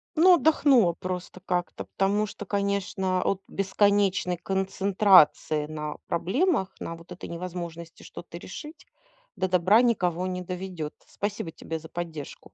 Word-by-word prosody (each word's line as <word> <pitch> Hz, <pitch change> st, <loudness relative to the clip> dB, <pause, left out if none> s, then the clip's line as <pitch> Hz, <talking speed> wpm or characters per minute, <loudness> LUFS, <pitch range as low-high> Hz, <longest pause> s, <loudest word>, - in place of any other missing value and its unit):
Но 355 Hz, +3 st, +7 dB
отдохнула 275 Hz, -, +4 dB
просто 185 Hz, +1 st, -6 dB
как-то. 180 Hz, -1 st, -2 dB
Потому 200 Hz, +2 st, +1 dB
что, 210 Hz, 0 st, -8 dB
конечно, 200 Hz, -2 st, -1 dB
от 195 Hz, -1 st, 0 dB
бесконечной 195 Hz, -2 st, +1 dB
концентрации 190 Hz, -5 st, +3 dB
на 150 Hz, -1 st, -5 dB
проблемах, 210 Hz, -, +1 dB
на 165 Hz, -, -5 dB
вот 165 Hz, +2 st, -16 dB
этой 180 Hz, -, -8 dB
невозможности 170 Hz, -1 st, -7 dB
что-то 170 Hz, 0 st, -10 dB
решить, 305 Hz, -, -10 dB, 0.5 s
до 185 Hz, -1 st, 0 dB
добра 185 Hz, +5 st, +4 dB
никого 180 Hz, -7 st, +1 dB
не 180 Hz, 0 st, -3 dB
доведет. 180 Hz, -3 st, -5 dB
Спасибо 205 Hz, -5 st, -4 dB
тебе 160 Hz, 0 st, -6 dB
за 160 Hz, -, -12 dB
поддержку. 165 Hz, -4 st, -6 dB
185 Hz, 130 wpm, -26 LUFS, 170-200 Hz, 0.5 s, Но